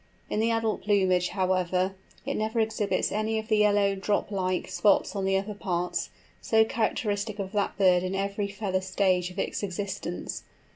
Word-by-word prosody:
In - - 0
the 225 +1 +2
adult 225 -1 0
plumage, 190 -3 +2
however, 185 0 0 0.3
it - - -1
never 220 +2 -1
exhibits 220 -2 0
any 215 +1 0
of 220 +1 -4
the 215 - +4
yellow, 205 -1 +4
drop 200 +2 -1
like, 185 -2 -1
spots 190 +3 +2
on 195 -1 -1
the 195 0 +2
upper 200 +2 -3
parts, 180 -4 -2 0.3
so 220 0 +4
characteristic 215 -2 -1
of 195 -2 -4
that 205 -2 -1
bird 185 -3 +5
in 185 +1 -2
every 200 +1 -1
feather 195 -2 -2
stage 185 -1 +1
of 180 - -13
its - - -2
existence. 195 -2 -4
200 Hz, 175 wpm, -27 LUFS, 185-210 Hz, 0.3 s, bird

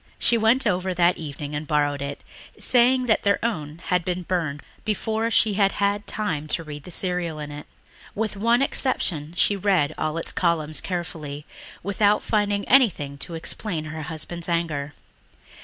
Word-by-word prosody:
She 235 - +4
went 230 +4 +3
over 185 -2 0
that 175 0 +3
evening 145 -1 -6
and 150 +1 -4
borrowed 145 -1 +1
it, 140 0 -5 0.4
saying 255 +1 +5
that 220 -3 +3
their 200 0 +3
own 155 -7 -3
had 180 -1 +1
been 180 +1 -2
burned 160 -5 -2 0.2
before 220 +1 -1
she 220 -2 +3
had 195 -1 +3
had 205 +1 0
time 160 -8 -2
to 165 - -2
read 150 -2 -8
the - - -9
serial 180 -2 -1
in 150 -1 -6
it. 145 0 -8 0.5
With 215 -1 -2
one 230 +5 +3
exception 170 - -1
she 205 - +3
read 185 -7 +2
all 155 +1 -1
its 165 - -1
columns 160 -3 +1
carefully 160 -5 -5 0.4
without 205 +2 +2
finding 205 -2 0
anything 170 - +3
to 170 - -6
explain 165 0 -3
her 155 +1 -6
husband's 165 +2 -4
anger. 150 -4 -1
175 Hz, 165 wpm, -24 LUFS, 155-205 Hz, 0.5 s, saying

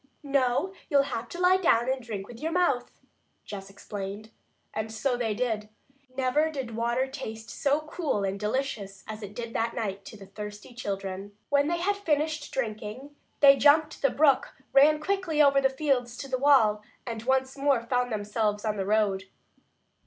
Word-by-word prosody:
"No, 275 +5 +1 0.2
you'll 280 -3 +5
have 230 0 -4
to 350 - -7
lie 365 +1 +5
down 240 -10 +3
and 260 0 0
drink 210 -5 -6
with 235 -1 -11
your 320 +3 -2
mouth," 330 -8 +1 0.6
Jess 195 -1 -7
explained. 200 +2 -7 0.4
And 220 0 -3
so 245 +3 0
they 225 -3 -1
did. 220 -3 -2 0.5
Never 270 +4 +2
did 265 -7 -5
water 235 +3 +1
taste 230 -5 -7
so 285 +2 +1
cool 305 - -2
and 195 0 -2
delicious 210 -3 -3
as 215 0 -6
it 205 0 -8
did 235 -1 -5
that 230 +1 -1
night 200 -3 -3
to 215 - -10
the 195 - -11
thirsty 210 +3 -9
children. 200 -3 -5
When 285 0 +3
they 345 +2 0
had 405 +3 +1
finished 305 -4 -1
drinking 235 +3 -4 0.3
they 275 -1 +8
jumped 300 +2 +4
the 275 - +4
brook, 280 0 +3 0.2
ran 300 +3 +6
quickly 365 -2 -1
over 280 -2 +6
the 265 - +4
fields 265 -4 0
to 275 - -6
the 260 -1 -1
wall, 230 -7 +5 0.2
and 230 -2 -4
once 265 +2 +1
more 275 -3 +2
found 245 +1 0
themselves 210 0 -1
on 215 -1 -1
the 195 - -1
road. 205 -3 +1
245 Hz, 175 wpm, -28 LUFS, 215-285 Hz, 0.6 s, they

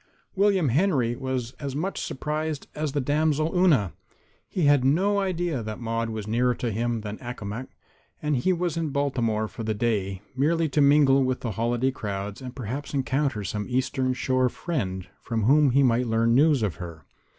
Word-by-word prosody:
William 195 -6 +3
Henry 130 -5 +2
was 130 -2 -3
as 140 -2 -4
much 185 +7 -2
surprised 155 +1 -3
as 150 -2 -3
the 145 - +1
damsel 155 +4 +1
Una. 150 - +3 0.6
He 180 - -1
had 145 -3 +5
no 190 +10 +3
idea 175 -7 -1
that 110 -1 -6
Maude 115 -1 -2
was 110 -2 -4
nearer 120 +3 +2
to 120 -1 -2
him 115 +1 -1
than 105 0 -6
Accomac, 120 -1 -6 0.5
and 150 -1 0
he 185 +10 +2
was 175 -2 -1
in 165 -2 -1
Baltimore 120 -6 0
for 115 +1 -7
the 110 0 -1
day 100 -4 -1
merely 160 +5 +2
to 145 +2 +2
mingle 140 -1 +5
with 130 0 -1
the 115 - -2
holiday 120 +5 0
crowds 100 -2 -5
and 125 -1 -8
perhaps 135 +4 -5
encounter 135 -4 0
some 105 +2 -3
Eastern 130 0 0
Shore 130 0 +1
friend 95 - -3
from 115 -2 -2
whom 145 +5 +5
he 135 +3 +4
might 125 -1 +2
learn 115 +1 +2
news 145 -1 +4
of 100 -5 -1
her. 85 -3 -9
130 Hz, 180 wpm, -26 LUFS, 115-150 Hz, 0.6 s, had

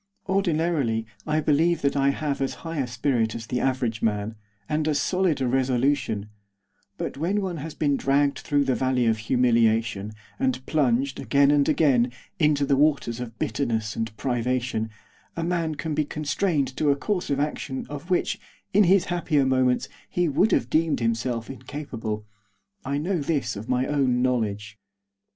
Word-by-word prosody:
Ordinarily 160 - +1 0.2
I 155 +1 +1
believe 160 +3 +2
that 140 - +2
I 140 0 +3
have 140 0 -2
as 135 - -1
high 165 -2 -3
a 130 - 0
spirit 115 -2 0
as 115 0 -6
the 125 +1 -2
average 125 -4 0
man, 105 0 0 0.3
and 155 0 0
as 150 -2 +2
solid 180 -5 +1
a 130 - +1
resolution; 125 -4 0 0.7
but - - -4
when 180 +8 0
one 185 -4 -3
has 155 +2 -6
been 145 -2 +1
dragged 140 +1 +2
through 145 -1 +1
the 135 -1 +1
Valley 130 -1 +1
of 110 -1 +2
Humiliation, 115 -3 +2 0.3
and 260 - 0
plunged, 135 -3 +1
again 140 0 +3
and 145 -1 +3
again, 130 -6 +3 0.3
into 150 -3 +3
the 140 0 +3
Waters 140 -5 +2
of 115 -2 -7
Bitterness 110 -6 -1
and 115 -1 -4
Privation, 125 -2 -1 0.5
a 165 - -1
man 165 -2 -1
can 155 +2 -3
be 150 - +1
constrained 150 -1 -1
to 150 - +2
a 140 - +4
course 180 +5 -2
of 140 -1 0
action 145 -2 -3
of 145 +5 -8
which, 180 - +1 0.3
in 205 +1 +6
his 185 +1 +4
happier 155 -5 +1
moments, 130 -1 +2 0.2
he 175 -1 +1
would 170 +8 +2
have 115 - +2
deemed 160 0 +2
himself 115 0 -1
incapable. 125 -5 -5 0.6
I 140 +1 -1
know 175 +4 -1
this 145 -3 -1
of 105 +3 -8
my 125 0 +2
own 130 -4 +1
knowledge. 110 -4 -1
135 Hz, 170 wpm, -25 LUFS, 120-155 Hz, 0.7 s, in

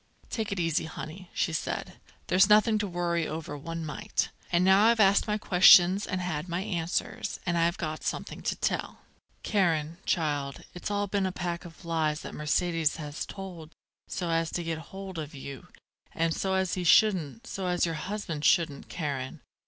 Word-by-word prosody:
"Take 220 -3 -2
it 200 - -2
easy, 165 -2 +1
honey," 160 +3 -8
she 165 - -1
said. 160 - -3 0.3
"There's 190 +2 +4
nothing 215 +1 +5
to 205 - -1
worry 170 -2 -1
over 155 -1 -5
one 165 +3 -5
mite. 205 +7 -2 0.2
And 175 +1 +3
now 190 +2 +6
I've 230 0 +4
asked 200 0 +5
my 210 0 +1
questions 185 0 +6
and 185 -1 -2
had 175 -2 -3
my 170 +2 -1
answers, 175 -4 -2
and 175 -2 0
I've 170 +1 +2
got 155 -2 -4
something - - -4
to - - -1
tell. - - -2 0.4
Karen, 170 -5 +1
child, 145 -5 -1
it's 180 - -5
all 205 0 0
been 200 -1 0
a - - -2
pack 175 0 -4
of 170 +1 -12
lies 160 -2 0
that - - -8
Mercedes 160 +1 +1
has 150 -1 -5
told 175 -5 -8 0.3
so 175 -2 -3
as 165 0 +1
to 175 - -2
get 165 -1 -3
hold 190 -3 -7
of 150 0 -6
you, 135 -2 -8 0.5
and 165 0 +1
so 190 +2 -1
as 190 -2 0
he 180 - -2
shouldn't 190 - +3
so 190 -5 -4
as 180 -1 +2
your 165 - -2
husband 165 -2 -4
shouldn't, 160 -5 +2
Karen. 140 -6 -4
175 Hz, 185 wpm, -28 LUFS, 160-190 Hz, 0.5 s, now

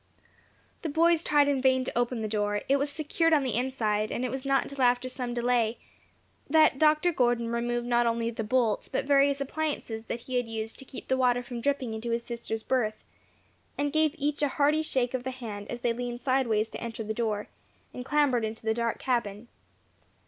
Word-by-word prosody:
The 325 - -3
boys 330 +2 +3
tried 290 -1 +4
in 280 -2 +1
vain 260 0 +3
to - - -5
open 240 -1 0
the - - -1
door; 205 -1 -1
it 275 - +4
was 280 +1 -1
secured 315 +2 0
on 295 -3 +4
the 255 - -1
inside, 220 -4 0
and 250 - -2
it 250 - -2
was 265 +1 -4
not 275 0 +3
until 280 -1 -6
after 245 0 +3
some 250 -1 -4
delay 240 -1 +1 0.7
that 310 -3 +5
Dr. 310 +3 +4
Gordon 240 -3 +1
removed 240 +1 -1
not 240 0 +2
only 230 0 0
the 225 -1 -4
bolt, 225 -2 +1
but - - -1
various 280 0 +4
appliances 275 -6 -3
that 235 - -4
he 255 +1 -3
had 245 -1 0
used 225 0 -4
to 270 - -5
keep 260 - -10
the 260 - +1
water 245 -1 +2
from 240 -1 -6
dripping 270 -3 -1
into 220 +2 -4
his 235 0 -1
sister's 230 -2 -4
berth, 220 -4 -1 0.7
and 285 0 -1
gave 310 -1 +2
each 295 0 -1
a 290 - +3
hearty 295 +3 +2
shake 260 -5 -1
of 255 -1 -2
the 260 - -3
hand 220 -6 -7
as 240 - -5
they 240 -1 +1
leaned 240 0 -4
sideways 240 -5 +1
to - - -8
enter 230 -1 -5
the 220 0 -3
door, 215 -2 -2 0.5
and 250 - -6
clambered 275 -4 +2
in 220 0 -3
the 220 0 +1
dark 235 0 -1
cabin. 235 -3 -2
245 Hz, 210 wpm, -28 LUFS, 230-275 Hz, 0.7 s, that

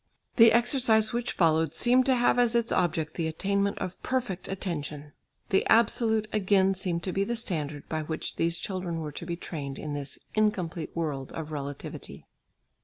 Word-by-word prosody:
The 230 -2 +8
exercise 235 -2 +3
which 240 0 -2
followed 160 -2 +2
seemed 250 +2 +3
to 260 - +4
have 245 0 +3
as 240 -1 +3
its 235 0 +2
object 165 -3 0
the 165 -2 -2
attainment 200 +5 0
of 185 - -5
perfect 245 -8 -2
attention. 150 -6 -5 0.4
The 195 - +3
absolute 220 -1 +3
again 195 -2 +3
seemed 180 -3 -2
to 185 - -2
be 195 +2 0
the 235 +4 -2
standard 150 -10 -4
by 160 0 -2
which 155 +1 -4
these 170 +1 +1
children 180 -4 -4
were 150 -1 -5
to 165 +3 -8
be 170 - -2
trained 145 -5 -6
in 150 -1 -5
this 140 -1 -5 0.2
incomplete 180 -7 -1
world 145 -5 -3
of 160 -1 -6
relativity. 145 -1 -7
185 Hz, 175 wpm, -28 LUFS, 160-220 Hz, 0.4 s, The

